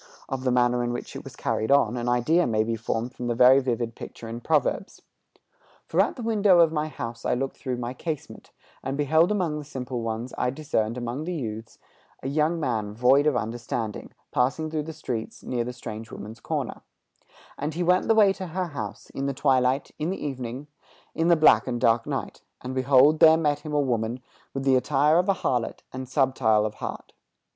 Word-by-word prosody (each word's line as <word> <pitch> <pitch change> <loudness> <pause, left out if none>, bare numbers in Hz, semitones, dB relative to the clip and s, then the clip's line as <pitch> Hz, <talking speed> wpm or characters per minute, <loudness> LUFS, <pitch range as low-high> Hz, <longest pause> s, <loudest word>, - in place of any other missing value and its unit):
Of 130 -1 -4
the 130 - +1
manner 125 0 +2
in 120 0 -1
which 120 - -6
it - - -6
was - - -10
carried 110 - -1
on, 135 -5 +4
an 120 0 -2
idea 150 +9 +3
may 110 -2 +2
be 115 +1 -2
formed 115 +2 -3
from 125 - -5
the 120 - 0
very 125 +3 +7
vivid 120 -3 -2
picture 115 - -9
in 115 +1 -6
Proverbs: 155 +6 0 0.8
"For - - +2
at - - 0
the 245 - -7
window 205 -5 +4
of 165 -2 +5
my 155 -1 -1
house, 115 -6 -6
I - - +1
looked 135 +2 -3
through 125 -2 -3
my 120 0 -4
casement, 155 +1 -6 0.3
And 135 +1 -3
beheld 160 +5 +3
among 175 -7 0
the - - -7
simple 130 -4 -5
ones, 115 +2 -4
I - - +1
discerned 125 -5 -1
among 125 +5 -4
the 180 +1 -3
youths, 110 -5 -6 0.5
A - - -3
young 155 +4 +1
man 110 -8 -2
void 130 +5 +4
of 145 -5 +2
understanding, 115 -1 -4 0.2
Passing 145 +5 0
through 155 -2 -2
the 160 - -5
streets 125 -7 -5
near 125 - -3
her 120 - 0
(the 125 - -4
strange 110 -2 -8
woman's) 110 +3 -9
corner; - - -3 0.7
And 150 +2 -4
he 175 - -1
went 180 +2 +3
the 225 - +4
way 205 -3 +6
to 190 -1 -6
her 180 +1 -3
house, 105 -9 -7
In 135 0 -3
the 140 - -2
twilight, 130 -1 +2
in 155 +2 -1
the 190 - -4
evening, 130 -1 -5 0.5
In 165 - 0
the 170 - +6
black 155 -3 +5
and 120 -2 -2
dark 115 0 +2
night; - - -4 0.2
And, 130 +1 -5
behold, 135 +3 +4
there 160 0 +8
met 150 -3 +1
him 150 0 -7
a - - +3
woman 120 -2 -1 0.3
With 135 - -4
the 135 -1 +4
attire 145 +5 +3
of 180 +3 0
a 195 - +4
harlot, 125 -8 -2
and 130 -1 -6
subtile 130 -6 +2
of 105 - -3
heart. - - -6
130 Hz, 210 wpm, -25 LUFS, 120-155 Hz, 0.8 s, there